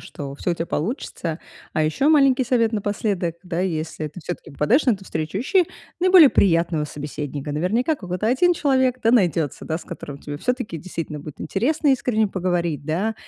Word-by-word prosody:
что 140 -1 -7
всё 175 - -1
у - - -2
тя 165 - -3
получится. 170 - -3 0.4
А 155 - +2
ещё 215 - +1
маленький 275 -4 +5
совет 230 -2 +2
напоследок: 205 -4 -1
да, 175 -1 -2
если 160 -3 -2
ты 150 - -11
всё-таки 175 - -6
попадаешь 230 - +2
на 245 - +5
эту 195 -2 -5
встречу, 160 +1 -4
ищи 360 - +3 0.4
наиболее 365 -5 +8
приятного 165 -4 +2
собеседника. 145 0 -5
Наверняка, 220 - +1
какой-то 185 -3 -4
1 350 +10 +3
человек 260 -5 +1
да 225 - +4
найдётся, 170 - +1
да, 160 - -1
с 170 - -9
которым 145 -4 -8
тебе 145 0 -7
всё-таки 250 - -2
действительно 165 -2 -5
будет 150 -1 -9
интересно 290 +9 0
искренне 245 -5 +2
поговорить, 175 -6 -1
да, 195 +8 0
185 Hz, 175 wpm, -22 LUFS, 160-250 Hz, 0.4 s, наиболее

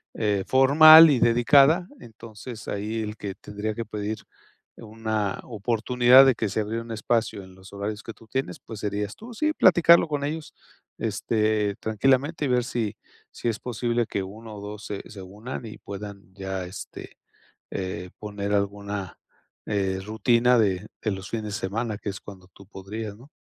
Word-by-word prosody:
eh, 105 -3 0
formal 155 +5 +9
y 130 -4 +3
dedicada. 140 +9 +5
Entonces, 110 0 -11
ahí 105 +3 -3
el 105 0 -5
que 100 -2 -5
tendría 105 +1 -5
que 115 - -4
pedir 105 0 -4 0.6
una 110 -2 -3
oportunidad 120 +3 +4
de 130 -3 +4
que 110 -3 -2
se 110 - -2
abriera 110 +2 -2
un 115 - -10
espacio 110 -2 -1
en 95 0 -15
los 95 +1 -15
horarios 105 +1 -5
que 115 - -8
tú 110 +2 -19
tienes, 130 -7 -3
pues, 110 -2 -10
serías 105 0 -3
tú. 235 +2 -11
Sí, 305 +6 0
platicarlo 170 - +6
con 145 -2 -2
ellos, 155 +2 -4 0.5
este, 105 -2 0
tranquilamente 135 +8 +1
y - - 0
ver 125 -1 +2
si 115 -4 -3 0.4
si - - -5
es 110 - -3
posible 120 0 -1
que 100 -1 -3
1 110 +3 -10
o 100 - -9
2, 105 +1 -8
se 100 - -5
se 100 -3 -10
unan, 105 +7 -8
y 110 - -9
puedan 100 -2 -9
ya, 95 -1 -4
este, 90 - -10 0.5
eh, 90 -1 -5
poner 105 -1 -4
alguna, 100 -1 -3 0.5
eh, 95 -2 -1
rutina 115 +3 +3
de 100 -2 +1 0.2
de 110 - 0
los 95 0 -7
fines 110 -2 -3
de 105 - -5
semana, 110 +1 -3
que 105 - -7
es 100 - -4
cuando 95 -2 -13
tú 95 +1 -17
podrías, 100 +2 -7
¿no? 130 +6 -17
110 Hz, 175 wpm, -25 LUFS, 100-120 Hz, 0.6 s, formal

